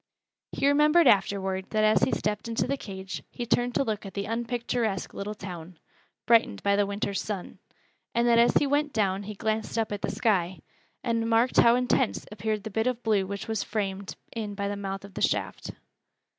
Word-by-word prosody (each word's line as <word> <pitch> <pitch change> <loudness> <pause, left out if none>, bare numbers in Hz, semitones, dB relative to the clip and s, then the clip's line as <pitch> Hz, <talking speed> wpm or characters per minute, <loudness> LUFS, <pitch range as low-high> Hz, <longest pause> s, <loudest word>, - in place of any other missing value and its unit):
He 275 - +1
remembered 300 +4 +5
afterward 190 -3 +2
that 215 -1 +1
as 215 0 +4
he - - +3
stepped 210 +1 -2
into 230 -1 0
the 275 - 0
cage 190 -6 -7
he 240 - -5
turned 245 +1 +1
to - - +3
look 220 -5 -3
at 195 -3 -9
the 200 - -2
unpicturesque 230 -3 -2
little 210 +2 -5
town, 180 -3 -8 0.5
brightened 225 - +3
by 200 0 +3
the 205 0 +2
winter's 200 -1 -2
sun; 200 -4 -6 0.6
and 235 +1 +3
that 235 -1 +5
as 235 - +4
he - - +3
went 290 +1 +1
down 195 -3 +1
he 210 +1 -7
glanced 220 +2 -2
up 225 -2 0
at 205 -1 -3
the - - -1
sky, 185 -5 +1 0.5
and 230 -2 0
marked 230 +2 +3
how 235 0 +6
intense 250 0 +1
appeared 210 0 -2
the 220 - -6
bit 220 +4 0
of 245 -1 -2
blue 205 -4 +2
which 200 0 -5
was 220 -2 -1
framed 200 -2 -3 0.2
in 210 -3 -4
by 200 0 -2
the 205 - -2
mouth 195 -1 -5
of 200 - -13
the - - -6
shaft. - - -1
215 Hz, 200 wpm, -27 LUFS, 200-235 Hz, 0.6 s, how